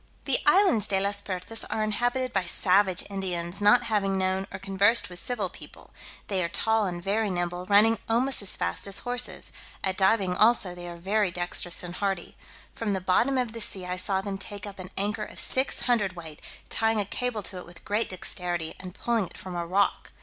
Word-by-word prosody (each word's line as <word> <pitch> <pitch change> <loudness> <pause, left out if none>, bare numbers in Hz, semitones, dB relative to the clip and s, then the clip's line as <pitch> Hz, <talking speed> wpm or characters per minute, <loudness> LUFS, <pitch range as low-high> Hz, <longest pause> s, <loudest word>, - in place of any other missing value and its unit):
The - - +4
islands 360 - +5
De 195 -1 +2
las 200 +1 0
Pertas 200 +3 -5
are 215 - -1
inhabited 245 +4 0
by 195 -2 +1
savage 185 0 +2
Indians, 185 -2 -3
not 210 +4 +6
having 200 -4 0
known 190 +1 0
or - - -5
conversed 195 +4 +2
with 175 - -5
civil 245 +7 -1
people: - - -13 0.4
they 190 -3 +1
are 170 - -1
tall 220 +3 +2
and 175 -1 -5
very 210 +2 +1
nimble, 175 0 -3
running 210 +2 +5
almost 245 +3 +2
as 200 - -1
fast 85 - -1
as 195 - -3
horses; 245 0 -3 0.3
at 190 -1 0
diving 190 -1 +3
also 215 -3 +4
they 175 0 -8
are 170 - -8
very 200 +3 +1
dextrous 175 0 0
and 175 0 -7
hardy. 195 -3 -2 0.4
From 215 -3 -2
the 190 - 0
bottom 210 +9 +2
of 250 -3 0
the 230 0 -6
sea 195 -4 -2
I 180 0 -3
saw 190 +1 0
them 195 -1 -5
take 205 0 -6
up 200 -1 -9
an 185 0 -7
anchor 205 +2 0
of - - -6
six 260 +1 +1
hundredweight, 185 -10 -1 0.3
tying 225 -1 +1
a 205 - 0
cable 225 +1 -2
to 185 - -4
it 180 - -8
with 175 -1 -15
great 210 +3 0
dexterity, 175 -3 -2
and 185 -1 -8
pulling 230 -5 0
it - - -14
from 185 - -7
a 170 -1 -3
rock. 200 +3 +1
195 Hz, 205 wpm, -27 LUFS, 180-220 Hz, 0.4 s, not